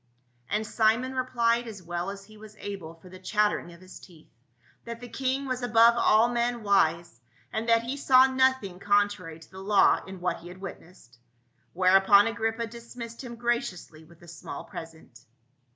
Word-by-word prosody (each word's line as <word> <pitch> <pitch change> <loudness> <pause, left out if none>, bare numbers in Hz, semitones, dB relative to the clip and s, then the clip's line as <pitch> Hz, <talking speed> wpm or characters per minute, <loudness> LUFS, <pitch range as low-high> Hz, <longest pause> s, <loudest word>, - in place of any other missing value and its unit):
And 210 +2 -1
Simon 225 +4 +1
replied 240 -2 0
as 200 -5 -9
well 175 +2 -4
as 195 0 -8
he 215 +1 -17
was 215 0 -14
able 195 -6 -7
for 165 +3 -18
the 185 0 -12
chattering 210 -1 0
of 170 +1 -16
his 185 0 -12
teeth, 165 -4 -18 0.5
that 235 0 -7
the 245 - -9
king 265 +3 -2
was 255 -1 -3
above 235 -1 +5
all 225 -1 +4
men 240 -1 -1
wise, 170 - +1 0.3
and 225 +2 -2
that 230 0 +4
he 255 +4 -4
saw 260 -2 +6
nothing 260 -8 +1
contrary 205 -5 0
to 165 - -18
the 190 - -11
law 200 0 +3
in 190 -1 -9
what 175 -1 -1
he 170 - -13
had 180 +1 -11
witnessed. 165 -10 -12 0.5
Whereupon 195 +2 +5
Agrippa 230 0 -2
dis 235 +1 -12
missed 230 0 -8
him 240 -2 -8
graciously 230 -9 -3
with 170 +1 -20
a - - -14
small 170 -1 -8
present. 160 -7 -11
210 Hz, 180 wpm, -27 LUFS, 180-235 Hz, 0.5 s, saw